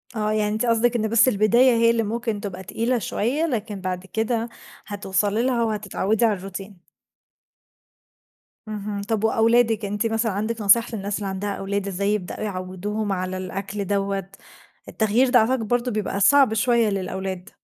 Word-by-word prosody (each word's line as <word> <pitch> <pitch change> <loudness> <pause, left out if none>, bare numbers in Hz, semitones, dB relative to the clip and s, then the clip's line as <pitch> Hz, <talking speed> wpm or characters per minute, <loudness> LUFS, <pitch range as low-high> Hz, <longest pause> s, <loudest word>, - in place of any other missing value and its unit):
آه، 215 -1 0
يعني 210 -1 0
أنتِ 220 +3 -1
قصدِك 235 +1 +2
إن 220 -1 +1
بس 230 +2 +5
البداية 235 +3 +4
هي 230 0 +4
اللي 230 -1 +2
ممكن 225 -1 -3
تبقى 190 -2 -6
تقيلة 235 +5 -1
شوية، 255 +11 -1
لكن 215 - -3
بعد 185 0 -4
كده 225 +3 -2 0.4
هتوصلي 205 +2 0
لها 250 -2 +1
وهتتعودي 215 0 0
على 220 - +3
الروتين. 195 0 -8 1.9
اهم، 210 -1 -4
طب 215 +1 -2
وأولادِك 225 -1 +3
أنتِ 205 +2 -2
مثلًا 225 0 0
عندك 215 +3 -3
نصايح 230 +4 +4
للناس 200 -1 -3
اللي 205 - -4
عندها 195 +1 -3
أولاد 200 0 -3
إزاي 200 +2 0
يبدؤوا 195 -4 -4
يعوّدوهم 200 +2 -3
على 185 0 -2
الأكل 195 +2 -5
دوّة، 195 -1 -1 0.6
التغيير 225 +4 +2
ده 245 0 +6
أعتقد 230 0 +1
برضو 245 +2 0
بيبقى 210 -2 -2
صعب 275 +1 +5
شوية 230 0 +2
للأولاد. 190 -1 -4
210 Hz, 155 wpm, -23 LUFS, 195-230 Hz, 1.9 s, ده